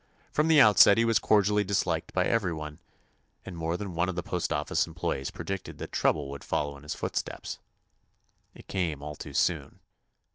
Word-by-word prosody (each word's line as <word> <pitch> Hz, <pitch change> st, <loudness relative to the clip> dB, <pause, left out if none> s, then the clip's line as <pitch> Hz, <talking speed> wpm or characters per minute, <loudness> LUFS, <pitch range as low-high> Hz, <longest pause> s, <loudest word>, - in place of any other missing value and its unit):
From 150 Hz, +1 st, +1 dB
the 160 Hz, -2 st, +6 dB
outset 105 Hz, -3 st, +7 dB
he 115 Hz, -, +3 dB
was 115 Hz, -1 st, +3 dB
cordially 105 Hz, 0 st, +3 dB
dis 100 Hz, 0 st, 0 dB
liked 85 Hz, -2 st, -2 dB
by 90 Hz, 0 st, +1 dB
everyone, 80 Hz, -9 st, -2 dB, 0.7 s
and 95 Hz, -, -7 dB
more 85 Hz, +1 st, -2 dB
than 100 Hz, -2 st, -6 dB
one 85 Hz, +2 st, 0 dB
of 90 Hz, -, -4 dB
the 90 Hz, -, -3 dB
postoffice -, -, -1 dB
employees 70 Hz, -, -3 dB
predicted 95 Hz, -1 st, -6 dB
that -, -, -7 dB
trouble 75 Hz, -3 st, +1 dB
would 70 Hz, -, -8 dB
follow 75 Hz, -1 st, -2 dB
in 70 Hz, -, -13 dB
his 75 Hz, -, -5 dB
foot -, -, -4 dB
steps. -, -, -4 dB, 1.0 s
It -, -, -15 dB
came 85 Hz, -7 st, -2 dB
all 75 Hz, 0 st, -6 dB
too -, -, -9 dB
soon. -, -, 0 dB
90 Hz, 185 wpm, -28 LUFS, 75-100 Hz, 1.0 s, outset